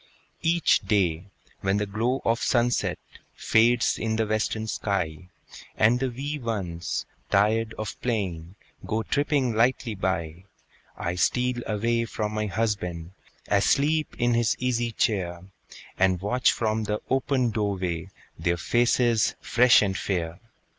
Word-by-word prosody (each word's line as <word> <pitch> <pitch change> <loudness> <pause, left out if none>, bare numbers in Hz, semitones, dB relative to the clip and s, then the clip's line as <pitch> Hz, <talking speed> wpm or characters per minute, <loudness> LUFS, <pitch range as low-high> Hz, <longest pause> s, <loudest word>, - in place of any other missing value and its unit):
Each 170 0 +3
day, 90 -5 0 0.3
when 95 +1 0
the 105 - 0
glow 115 +6 -1
of 115 +1 +1
sunset 120 -1 +1 0.4
Fades 115 +2 +3
in 110 -1 -1
the 110 0 +1
western 110 +1 -1
sky, 90 -5 -3 0.5
And 115 +3 +4
the 135 0 0
wee 140 +5 -4
ones, 90 -8 -3 0.2
tired 110 +3 +2
of 110 -1 -6
playing, 95 -7 -3 0.3
Go 110 +1 -2
tripping 140 -2 +1
lightly 120 +1 +1
by, 90 -3 -3 0.5
I 85 - -2
steal 125 +7 0
away 115 +2 0
from 110 -1 -3
my 105 0 -1
husband, 95 -5 -2 0.4
Asleep 145 +10 +2
in 120 0 +2
his 115 -1 +2
easy 120 -2 0
chair, 90 -6 -1 0.6
And 95 -1 +3
watch 125 +7 +2
from 110 -1 -1
the 105 +1 -1
open 130 -2 +1
door 105 -2 -1
way 90 -1 -3 0.3
Their 85 0 0
faces 120 +3 +2
fresh 120 -1 +5
and 95 -2 -1
fair. 85 -4 -2
110 Hz, 135 wpm, -26 LUFS, 95-120 Hz, 0.6 s, fresh